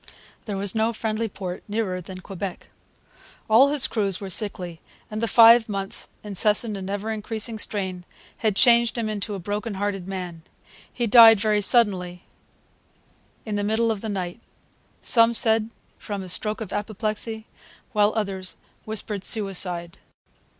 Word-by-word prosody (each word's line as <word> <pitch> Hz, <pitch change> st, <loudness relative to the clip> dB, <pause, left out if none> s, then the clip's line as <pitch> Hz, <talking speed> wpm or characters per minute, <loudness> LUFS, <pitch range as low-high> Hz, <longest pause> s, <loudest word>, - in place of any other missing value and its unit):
There 205 Hz, -3 st, -4 dB
was 195 Hz, 0 st, 0 dB
no 225 Hz, +1 st, +1 dB
friendly 220 Hz, 0 st, -2 dB
port 185 Hz, -3 st, -7 dB
nearer 205 Hz, -4 st, -2 dB
than 185 Hz, +1 st, -9 dB
Quebec. 195 Hz, 0 st, -7 dB, 0.8 s
All 235 Hz, +6 st, +6 dB
his 290 Hz, -2 st, +3 dB
crews 200 Hz, -5 st, -1 dB
were 195 Hz, -2 st, -6 dB
sickly; 180 Hz, -4 st, -3 dB, 0.3 s
and 215 Hz, +1 st, -4 dB
the 230 Hz, -, 0 dB
five 230 Hz, +1 st, +7 dB
months' 195 Hz, -1 st, -3 dB
incessant 210 Hz, +2 st, +2 dB
and 190 Hz, -1 st, -6 dB
ever 205 Hz, +2 st, -3 dB
increasing 220 Hz, +1 st, -2 dB
strain 190 Hz, -4 st, -3 dB, 0.3 s
had 215 Hz, -3 st, 0 dB
changed 235 Hz, +1 st, +4 dB
him 230 Hz, -2 st, -1 dB
into 210 Hz, -1 st, -3 dB
a -, -, -5 dB
broken 205 Hz, +3 st, -4 dB
hearted 195 Hz, -2 st, -3 dB
man. 180 Hz, -4 st, -6 dB, 0.5 s
He 240 Hz, -, -2 dB
died 225 Hz, -1 st, +8 dB
very 210 Hz, 0 st, +1 dB
suddenly, 190 Hz, -5 st, +1 dB, 1.2 s
in 210 Hz, -2 st, -3 dB
the 205 Hz, -, -1 dB
middle 225 Hz, +2 st, +1 dB
of 210 Hz, -3 st, -4 dB
the 220 Hz, -, -4 dB
night; 185 Hz, 0 st, -4 dB, 0.6 s
some 230 Hz, 0 st, +4 dB
said 220 Hz, -1 st, +2 dB, 0.3 s
from 200 Hz, -3 st, -5 dB
a 185 Hz, -, -8 dB
stroke 210 Hz, +4 st, 0 dB
of 210 Hz, -, -6 dB
apoplexy, 215 Hz, +1 st, -3 dB, 0.5 s
while 210 Hz, -1 st, +3 dB
others 195 Hz, -4 st, -3 dB, 0.3 s
whispered 210 Hz, -2 st, -4 dB
suicide. 180 Hz, -5 st, 0 dB
210 Hz, 150 wpm, -24 LUFS, 195-225 Hz, 1.2 s, died